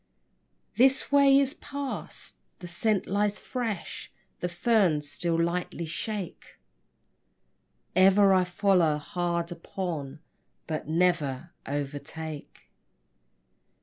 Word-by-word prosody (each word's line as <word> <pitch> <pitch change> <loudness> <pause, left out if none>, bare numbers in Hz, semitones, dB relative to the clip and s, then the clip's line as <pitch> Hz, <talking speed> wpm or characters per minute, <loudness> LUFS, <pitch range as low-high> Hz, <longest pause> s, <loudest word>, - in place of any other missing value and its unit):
This 265 +3 +4
way 280 -1 +6
it 275 +1 +1
passed: 280 -1 -5 0.2
the - - -10
scent 195 +4 0
lies 205 +1 0
fresh; 230 -8 -4 0.3
The 180 - -2
ferns 175 -5 +2
still 165 +2 0
lightly 170 0 -1
shake. 195 +3 -5 1.4
Ever 195 +1 +6
I 185 -1 +4
follow 180 -4 +2
hard 170 +2 -2
upon, 165 -5 -5 0.5
But 155 -3 -4
never 165 -3 +1 0.2
overtake. 145 +2 -6
175 Hz, 90 wpm, -28 LUFS, 160-205 Hz, 1.4 s, way